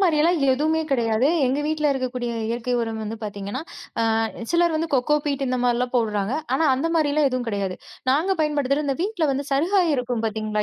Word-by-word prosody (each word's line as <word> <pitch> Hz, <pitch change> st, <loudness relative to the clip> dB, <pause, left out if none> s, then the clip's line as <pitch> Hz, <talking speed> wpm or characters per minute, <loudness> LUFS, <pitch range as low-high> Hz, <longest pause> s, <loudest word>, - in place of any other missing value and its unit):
மாரில்லாம் 335 Hz, -2 st, +3 dB
எதுவுமே 310 Hz, +4 st, +1 dB
கிடையாது. 235 Hz, 0 st, +2 dB, 0.2 s
எங்க 265 Hz, +3 st, 0 dB
வீட்டுல 305 Hz, -1 st, +1 dB
இருக்கக்கூடிய 250 Hz, -2 st, -3 dB, 0.2 s
இயற்கை 240 Hz, +1 st, -2 dB
உரம் 225 Hz, -1 st, -3 dB
வந்து 215 Hz, +1 st, -4 dB
பாத்தீங்கன்னா, 205 Hz, +6 st, -5 dB, 0.4 s
அ -, -, +2 dB, 0.5 s
சிலர் 340 Hz, -1 st, +3 dB
வந்து 330 Hz, +1 st, -1 dB
கோகோ 270 Hz, +3 st, +3 dB
பீட் 280 Hz, -2 st, -1 dB
இந்த 255 Hz, 0 st, 0 dB
மாரில்லாம் 245 Hz, +1 st, 0 dB
போட்றாங்க. 215 Hz, 0 st, 0 dB, 0.2 s
ஆனா 320 Hz, -, +2 dB
அந்த 270 Hz, +5 st, -1 dB
மாரில்லாம் 295 Hz, -2 st, +3 dB
எதுவும் 255 Hz, -1 st, -2 dB
கிடையாது. 200 Hz, -3 st, -2 dB, 0.3 s
நாங்க 330 Hz, +8 st, +2 dB
பயன்படுத்துறது 295 Hz, -1 st, +1 dB
இந்த 275 Hz, -, 0 dB
வீட்ல 375 Hz, -5 st, 0 dB
வந்து 275 Hz, +1 st, -3 dB
சருகாயி 340 Hz, +3 st, +2 dB
இருக்கும் 245 Hz, -2 st, -2 dB
பாத்தீங்களா, 215 Hz, -1 st, -1 dB
265 Hz, 175 wpm, -23 LUFS, 235-305 Hz, 0.5 s, மாரில்லாம்